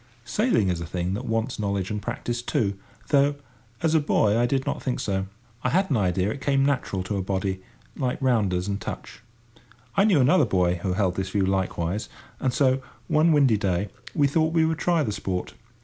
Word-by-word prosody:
Sailing 205 - +2
is 85 -2 -1
a - - -4
thing 90 +2 -2
that 115 +6 -4
wants 115 +2 -1
knowledge 100 -1 -1
and 105 -1 -3
practice 120 +1 -3
too—though, 120 +7 0 0.5
as 160 -1 +2
a 160 - +5
boy, 110 -7 +2
I 120 +1 +3
did 135 +1 0
not - - -2
think 130 - -2
so. 95 -1 -1 0.4
I 125 - +2
had 190 +5 +1
an 130 - +3
idea 95 0 +1
it 135 - -6
came 135 -1 +2
natural 130 -9 -1
to 100 +2 -3
a - - -1
body, 95 0 -2 0.3
like 125 -2 -2
rounders 105 -8 +1
and 100 0 -2
touch. - - -7 0.7
I 195 - +4
knew 195 -9 +4
another 145 +4 +5
boy 90 -4 +1
who 95 -1 -1
held 90 -2 0
this 95 -1 -2
view 95 0 +1
likewise, 95 0 -1 0.3
and 130 - +1
so, 130 0 +2 0.3
one 160 +1 +4
windy 140 -7 +4
day, 100 -1 -1 0.3
we 145 - +4
thought 160 +3 +1
we 160 -1 +4
would 160 0 -1
try 170 -3 +2
the 110 - -2
sport. 95 -3 -3
110 Hz, 200 wpm, -25 LUFS, 95-140 Hz, 0.7 s, a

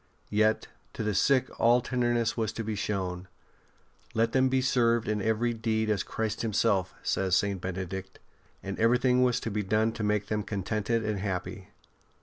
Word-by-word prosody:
Yet 110 +1 +2 0.3
to - - -4
the 105 -1 0
sick 130 +5 +3
all 120 +2 +5
tenderness 120 -2 0
was 110 -2 -1
to 115 - -4
be 110 0 -3
shown. 95 -3 -3 0.4
*' - - -33
Let 115 +1 +2
them 130 0 +3
be 130 0 +2
served 120 -3 +2
in 105 0 0
very 110 +3 +1
deed 110 -1 0
as 100 -4 +1
Christ 110 -1 -3
Himself," 100 -4 +1
says 95 -2 +1
St. 100 -2 0
Bene 95 +1 -3
dict; 95 +1 -7 0.5
and 95 0 -5
everything 125 +2 +3
was 125 -1 +3
to 115 - -3
be 105 +1 -1
done 110 +3 +1
to 115 - -7
make 105 -1 +1
them 105 0 -1
contented 110 +3 -2
and 105 -2 -1
happy. 95 +1 -4
110 Hz, 180 wpm, -28 LUFS, 100-115 Hz, 0.5 s, all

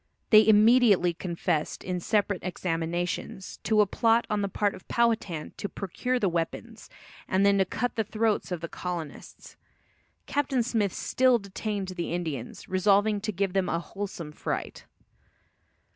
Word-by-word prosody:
They 215 -1 +8
immediately 215 -4 +5
confessed, 170 -2 -2
in 180 -1 -2
separate 200 0 0
examinations, 175 +1 -3
to 215 -1 +3
a - - +5
plot 230 +3 +2
on 210 -1 +1
the 200 - 0
part 205 +1 0
of - - -13
Powhatan 225 -9 0
to 205 - -4
procure 250 +6 -2
the 210 - +1
weapons, 180 +7 -4 0.4
and 190 +1 +2
then 200 0 +4
to 190 - +4
cut 245 +6 -2
the 220 - +1
throats 215 -1 -1
of 175 -2 -3
the 170 - -4
colonists. 170 -4 -7 0.7
Captain 270 -3 0
Smith 220 -4 0
still 255 +5 +2
detained 200 -1 -4
the 175 -2 -4
Indians, 155 -9 -5
resolving 200 +2 +2
to 215 +1 -2
give 195 -1 -1
them 195 -1 +1
a - - +1
wholesome 180 -4 -6
fright. - - -5
200 Hz, 150 wpm, -27 LUFS, 175-220 Hz, 0.7 s, They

